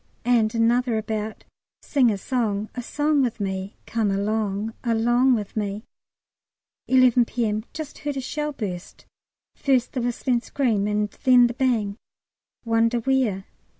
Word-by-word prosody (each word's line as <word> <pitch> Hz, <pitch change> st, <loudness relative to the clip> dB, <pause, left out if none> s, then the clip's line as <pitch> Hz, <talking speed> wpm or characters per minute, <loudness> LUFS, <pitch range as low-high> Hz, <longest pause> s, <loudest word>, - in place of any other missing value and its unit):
And 235 Hz, -2 st, +2 dB
another 235 Hz, +1 st, +2 dB
about 220 Hz, 0 st, -4 dB, 0.4 s
"Sing 265 Hz, -5 st, +3 dB
a 205 Hz, -, 0 dB
song 215 Hz, -2 st, -2 dB
a 245 Hz, -, -4 dB
song 295 Hz, +3 st, +1 dB
with 245 Hz, -4 st, -1 dB
me. 190 Hz, 0 st, -3 dB
Come 225 Hz, -3 st, 0 dB
along 205 Hz, +1 st, -1 dB
along 240 Hz, +2 st, +3 dB
with 210 Hz, -3 st, -5 dB
me." 210 Hz, 0 st, -3 dB, 1.0 s
11 255 Hz, -2 st, +5 dB
P.M. 220 Hz, -2 st, -2 dB
Just 310 Hz, -2 st, -7 dB
heard 290 Hz, -2 st, -3 dB
a -, -, 0 dB
shell 300 Hz, +3 st, -3 dB
burst, 190 Hz, -10 st, -7 dB, 0.5 s
first 260 Hz, -3 st, +1 dB
the 255 Hz, -, -1 dB
whistling 240 Hz, 0 st, 0 dB
scream, 230 Hz, -7 st, 0 dB
and 210 Hz, 0 st, 0 dB
then 250 Hz, -2 st, +7 dB
the 240 Hz, -, 0 dB
bang 230 Hz, -6 st, 0 dB, 0.7 s
wonder 230 Hz, +1 st, +2 dB
where? 235 Hz, -6 st, 0 dB
230 Hz, 140 wpm, -24 LUFS, 210-255 Hz, 1.0 s, then